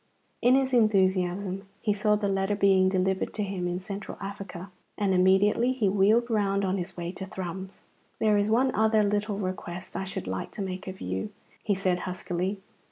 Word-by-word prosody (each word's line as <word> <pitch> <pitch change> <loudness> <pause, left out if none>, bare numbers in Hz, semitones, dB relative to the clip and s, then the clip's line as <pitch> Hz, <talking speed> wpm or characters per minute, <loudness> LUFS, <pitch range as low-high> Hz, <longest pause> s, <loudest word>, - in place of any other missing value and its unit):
In 250 +2 +5
his 265 -1 +1
enthusiasm 190 -3 +2
he 210 - +1
saw 210 +1 +2
the 205 -1 -1
letter 195 +1 0
being 195 -2 +4
delivered 190 0 0
to 210 - -1
him 190 -3 -3
in 175 +1 -2
Central 200 +1 -6
Africa, 195 -2 -7 0.3
and 200 -2 +1
immediately 195 +7 +4
he 235 -6 +1
wheeled 205 +5 +3
round 200 -3 +1
on 190 +1 0
his 185 +1 -6
way 170 0 -3
to 190 0 -7
Thrums. 190 0 -6 0.3
"There 215 -1 +3
is 205 +1 +2
one 255 +4 +3
other 220 0 +3
little 205 0 0
request 185 -2 -5
I 190 - -2
should 190 - -5
like 95 0 -4
to - - -5
make 185 0 -5
of 190 +1 -7
you," 215 - -3 0.3
he 205 - 0
said 185 -2 0
huskily. 185 +1 -3
195 Hz, 185 wpm, -27 LUFS, 185-210 Hz, 0.3 s, In